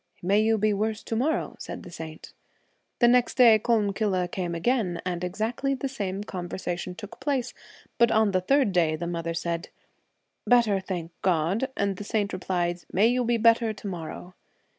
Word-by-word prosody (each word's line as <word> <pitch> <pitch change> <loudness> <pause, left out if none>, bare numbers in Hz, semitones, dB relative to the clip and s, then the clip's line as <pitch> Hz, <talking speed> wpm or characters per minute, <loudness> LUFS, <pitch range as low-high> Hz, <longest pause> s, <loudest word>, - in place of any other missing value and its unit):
' - - -34
May 210 - +5
you 220 0 +3
be 215 0 +2
worse 215 +2 -2
to 225 - -3
morrow,' 275 +8 0
said - - -7
the 175 - -11
saint. 160 -1 -9 0.6
The 240 - +5
next 245 0 +3
day 230 -4 +7
Collumcille 200 -5 0
came 175 -3 -3
again, 185 -2 0
and 180 -1 -2
exactly 225 +9 -1
the 275 - -3
same 200 -6 -4
conversation 180 -2 -5
took 205 +2 -10
place, 265 -4 -1 0.5
but 235 - +6
the 205 -4 +3
third 270 +2 +3
day 165 -4 +2
the 155 - -4
mother 170 -1 -3
said, 170 0 -3 0.4
' - - -42
Better, 225 -5 +4
thank 180 -3 -5
God.' 185 - +1
And 200 -2 0
the 205 - -6
saint 205 -1 -1
replied, 175 -1 -2
'May 210 +5 +4
you 250 +1 +1
be 235 0 +1
better 230 0 +4
to 210 - -9
morrow.' 175 0 -7
200 Hz, 180 wpm, -26 LUFS, 175-230 Hz, 0.6 s, day